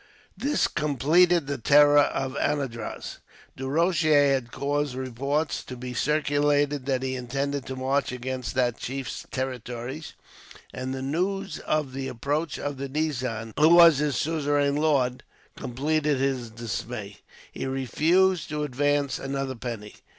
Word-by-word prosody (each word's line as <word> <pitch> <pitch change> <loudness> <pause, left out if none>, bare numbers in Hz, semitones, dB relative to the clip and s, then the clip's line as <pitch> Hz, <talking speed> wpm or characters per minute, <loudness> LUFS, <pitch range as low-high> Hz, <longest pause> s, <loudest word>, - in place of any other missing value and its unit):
This 290 +2 +1
completed 155 +3 +3
the 140 -1 -3
terror 145 +4 +6
of 135 -2 0
Anandraz. 135 -7 -3 0.4
Du 135 0 -5
Rocher 155 -2 +3
had 125 -3 -2
caused 145 -1 -1
reports 135 +4 -2
to 125 - -8
be 125 0 -6
circulated 145 -1 +1
that 130 -2 0
he 130 0 -2
intended 135 +2 -3
to 130 - -4
march 135 +1 0
against 125 -1 -4
that 125 -2 +1
chief's 135 0 -5
territories, 130 +2 -5 0.6
and 130 +1 -4
the 130 0 -4
news 195 +7 -2
of 150 -4 -1
the 135 0 -4
approach 145 +6 -2
of 145 -1 -4
the 135 0 -5
nizam, 130 -7 -2
who 155 +1 +6
was 170 -4 +8
his 150 -2 0
suzerain 145 -2 +1
lord, 140 -5 +1 0.3
completed 150 +3 0
his 130 -3 -1
dismay. 110 -2 -6 0.3
He - - -4
refused 160 +7 +2
to 150 0 -2
advance 145 0 0
another 135 -1 -3
penny. 115 -4 -7
140 Hz, 135 wpm, -26 LUFS, 130-150 Hz, 0.6 s, was